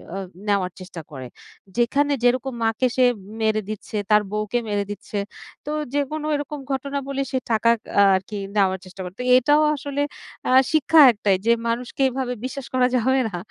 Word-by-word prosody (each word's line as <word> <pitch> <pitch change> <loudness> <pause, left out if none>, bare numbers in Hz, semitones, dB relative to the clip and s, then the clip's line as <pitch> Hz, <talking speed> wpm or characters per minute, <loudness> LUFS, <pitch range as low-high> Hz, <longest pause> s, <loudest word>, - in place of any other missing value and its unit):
আ - - -3 0.3
নেওয়ার 195 -3 +1
চেষ্টা 180 -2 -9
করে। 130 -3 -7 0.5
যেখানে 285 +5 +2
যেরকম 255 +2 +2
মাকে 225 +3 +1
সে 255 - +5 0.4
মেরে 220 0 +1
দিচ্ছে 215 0 -5
তার 210 0 +5
বউকে 215 +3 -1
মেরে 205 -1 0
দিচ্ছে।" 205 0 -6 0.5
তো 295 - -4 0.2
যেকোনো 290 +2 -2
এরকম 290 0 -4
ঘটনা 280 +1 -2
বলে 275 0 -2
সে 260 - 0
টাকা 225 +1 +3 0.3
আ - - +7
আর 185 - 0
কি 210 - -5 0.2
নেওয়ার 190 -2 +2
চেষ্টা 185 +1 -10
করত। 180 +2 -9 0.2
এটাও 295 +4 +4
আসলে 285 0 -4 0.5
আ - - +2 0.2
শিক্ষা 315 +1 +4
একটাই 205 -3 +1
যে, 230 - +4 0.2
মানুষকে 240 +3 -3
এভাবে 255 -1 -3
বিশ্বাস 265 0 -5
করা 250 -1 +3
যাবে 260 +3 +2
না। 175 - -5
240 Hz, 175 wpm, -22 LUFS, 205-275 Hz, 0.5 s, আ